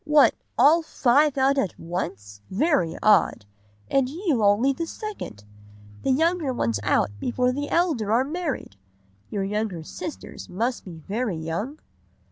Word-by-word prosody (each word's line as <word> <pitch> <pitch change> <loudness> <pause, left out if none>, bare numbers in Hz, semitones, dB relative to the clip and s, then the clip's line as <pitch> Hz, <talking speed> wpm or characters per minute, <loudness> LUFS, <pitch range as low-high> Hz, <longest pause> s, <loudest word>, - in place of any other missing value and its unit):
What, 300 -1 +5 0.2
all 325 +4 +6
five 285 -1 +2
out 270 +1 +3
at 195 -9 -2
once? 100 - -5
Very 190 - +1
odd! 210 - +4 0.4
And 270 -2 +2
you 310 - 0
only 210 +7 +4
the 335 +4 -4
second. 400 - -7 0.6
The - - -1
younger 320 +1 +2
ones 115 - -1
out 100 - +2
before 250 - +1
the 290 +3 -3
elder 305 - +1
are 235 +3 +4
married! 300 - -4 0.5
Your 200 -2 -2
younger 200 -4 -2
sisters 310 - -8
must 235 +7 -2
be 165 -4 -10
very 215 -3 -1
young? 170 - -4
250 Hz, 140 wpm, -25 LUFS, 185-295 Hz, 0.6 s, all